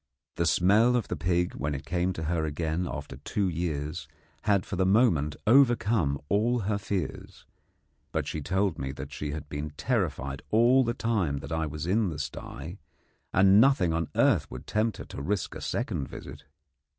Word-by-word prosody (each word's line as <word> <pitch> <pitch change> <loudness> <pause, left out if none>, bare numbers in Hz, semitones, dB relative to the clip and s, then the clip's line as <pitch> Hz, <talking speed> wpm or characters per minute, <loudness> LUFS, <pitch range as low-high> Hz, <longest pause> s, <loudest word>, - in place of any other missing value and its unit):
The 85 - 0
smell 105 +9 +4
of 120 - -1
the - - -1
pig 90 0 0
when 70 +3 -2
it 70 - -7
came 90 +2 0
to 80 - -5
her 80 0 0
again 80 +3 -2
after 70 -1 -7
two 95 +8 -1
years 80 -3 -3 0.4
had 100 -3 +3
for - - -4
the 95 - +2
moment 95 - +3
overcome 110 - +4
all 115 +7 +2
her 100 +1 -1
fears; 95 -6 -4 0.7
but - - -1
she 80 - -4
told 95 +3 0
me 65 0 -3
that - - -8
she 75 - -4
had 75 0 -5
been 75 +1 -4
terrified 75 - -1
all 120 +4 +5
the 120 -1 -1
time 100 -11 0
that - - -9
I 80 -1 0
was 75 +1 -5
in 100 +3 +2
the 80 - -5
sty, 75 +3 -6 0.5
and 95 +3 +6
nothing 115 -11 +4
on 80 -1 -1
earth - - +3
would - - -8
tempt 110 +1 0
her - - -7
to - - -8
risk 95 +5 -2
a - - -8
second 90 - -2
visit. - - -10
90 Hz, 185 wpm, -28 LUFS, 75-105 Hz, 0.7 s, and